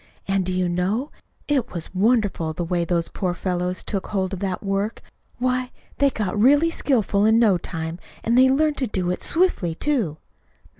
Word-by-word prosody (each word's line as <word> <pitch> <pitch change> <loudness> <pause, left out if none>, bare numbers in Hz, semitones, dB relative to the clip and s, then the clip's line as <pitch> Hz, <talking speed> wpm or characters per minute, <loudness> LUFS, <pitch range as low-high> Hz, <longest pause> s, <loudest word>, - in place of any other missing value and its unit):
And, 195 -1 +1
do - - 0
you 180 0 0
know? 190 - -1 0.4
it 270 -5 0
was 170 -1 -5
wonderful, 200 -5 +1
the 175 - -3
way 170 0 0
those 170 -1 0
poor 180 -2 -2
fellows 180 0 -2
took 195 -2 -3
hold 190 -2 -2
of 190 - -4
that 190 -1 -3
work! 200 +2 -2 0.3
Why, 255 0 0 0.3
they 280 -1 +5
got 210 -4 -2
really 290 +7 +5
skillful 220 -10 +1
in 220 +1 +5
no 210 -6 +4
time, 165 0 -5 0.2
and 230 - +1
they 260 +1 +6
learned 300 +2 +2
to 260 - -1
do 185 -4 -1
it 180 - -3
swiftly, 325 - +1
too." 220 - -1
200 Hz, 185 wpm, -23 LUFS, 180-250 Hz, 0.4 s, they